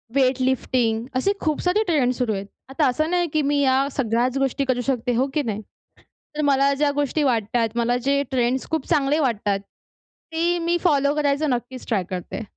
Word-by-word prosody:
Weightlifting 255 -3 +1
असे 325 +10 +2
खूप 310 -3 0
सारी 370 +4 +2
ट्रेंड 290 - +1
सुरु 245 -3 -1
आहेत. 195 0 -4 0.2
आता 275 +1 +1
असं 310 +6 0
नाही 350 -1 +1
की 310 - +2
मी 285 0 +1
या 270 0 +3
सगळ्याच 245 +1 0
गोष्टी 275 +1 0
करू 255 -2 0
शकते, 245 -2 0
हो 260 +4 +2
की 300 - +1
नाही? 215 -4 -3 0.8
तर - - 0
मला 275 +1 +3
ज्या 285 +1 +1
गोष्टी 290 +1 0
वाटतात, 230 -2 +1
मला 240 +1 +1
जे 280 0 +3
ट्रेंड्स 255 0 0
खूप 320 -4 -1
चांगले 295 -1 +2
वाटतात. 210 -7 0 0.7
ते 340 +2 +1
मी 345 +1 +2
फॉलो 285 -4 +3
करायचा 295 0 +1
नक्कीच 250 -1 -3
ट्राय 210 -6 0
करते. 185 +4 -5
270 Hz, 180 wpm, -23 LUFS, 245-295 Hz, 0.8 s, या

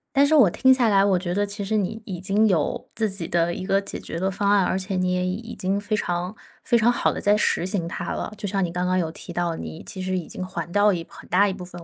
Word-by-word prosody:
但 280 +1 +6
是 310 +2 +3
我 255 -10 +7
听 260 +9 +3
下 250 -3 +4
来， 195 -1 +4
我 195 -2 +3
觉 175 -1 -3
得 205 +2 +1
其 200 0 -3
实 215 +2 -1
你 210 +2 -1
已 185 -4 -5
经 200 +4 +2
有 165 -7 0
自 220 -1 0
己 190 -4 -2
的 170 0 +1
一 185 - -5
个 195 +1 +2
解 200 - -6
决 165 - -5
的 190 +2 0
方 200 +1 0
案， 205 -2 +4
而 185 - 0
且 190 +1 -3
你 185 0 +1
也 180 0 0
已 185 - -1
已 230 +4 -7
经 195 +2 -1
非 210 +1 -1
常 175 +1 -2 0.3
非 240 - +3
常 235 +1 +4
好 240 - +1
地 - - -5
在 205 +1 +3
施 210 - +1
行 185 -3 -1
它 - - -4
了。 - - -4
就 205 -1 -4
像 195 0 0
你 170 - -2
刚 180 +1 -2
刚 185 0 +1
有 160 -2 -1
提 175 - -9
到， 175 -1 -1
你 80 - -7
其 185 - -6
实 185 0 -1
已 180 -3 -3
经 185 - -6
还 170 -2 -6
掉 205 +1 +4
一 170 -2 -3
很 - - -13
大 200 +4 +4
一 - - 0
部 185 -2 -8
分。 175 -1 -10
190 Hz, 325 characters per minute, -24 LUFS, 180-205 Hz, 0.3 s, 我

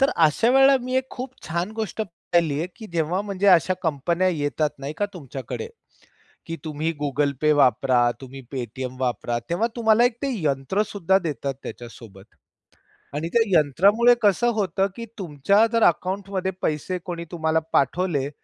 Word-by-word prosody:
तर 270 - +4 0.2
अशा 190 +10 +1
वेळेला 270 +1 +6
मी 255 +1 -4
एक 260 0 -1
खूप 255 0 -6
छान 170 +5 -2
गोष्ट 220 -1 -4
पाहिली 170 -5 -1
आहे, 165 - -1
की 220 - -9
जेव्हा 170 +3 0
म्हणजे 200 -1 -2
अशा 185 0 +5
कंपन्या 170 +4 0
येतात 150 -2 -1
नाही 140 +2 -5
का 205 - 0
तुमच्याकडे, 140 - -6 0.8
की 165 0 -4
तुम्ही 155 +1 -2
Google 145 0 0
Pay 150 0 +5
वापरा, 125 -2 +3
तुम्ही 135 +1 -9
Paytm 130 +1 -5
वापरा. 120 -2 -1
तेव्हा 175 +7 +1
तुम्हाला 225 0 +4
एक 245 -2 +1
ते 280 - 0
यंत्रसुद्धा 190 +7 +1
देतात 140 -3 -3
त्याच्यासोबत 110 -4 -11 0.8
आणि 155 +3 -2
त्या 235 - +4 0.2
यंत्रामुळे 200 - +4
कसं 210 +3 +3
होतं, 195 -2 0
की 235 - -6
तुमच्या 185 +6 +2
जर 230 - +3
अकाउंटमध्ये 190 +2 0
पैसे 155 +4 -1
कोणी 170 -2 -5
तुम्हाला 160 -1 +1
पाठवले. 145 -1 +1
170 Hz, 155 wpm, -23 LUFS, 140-205 Hz, 0.8 s, वेळेला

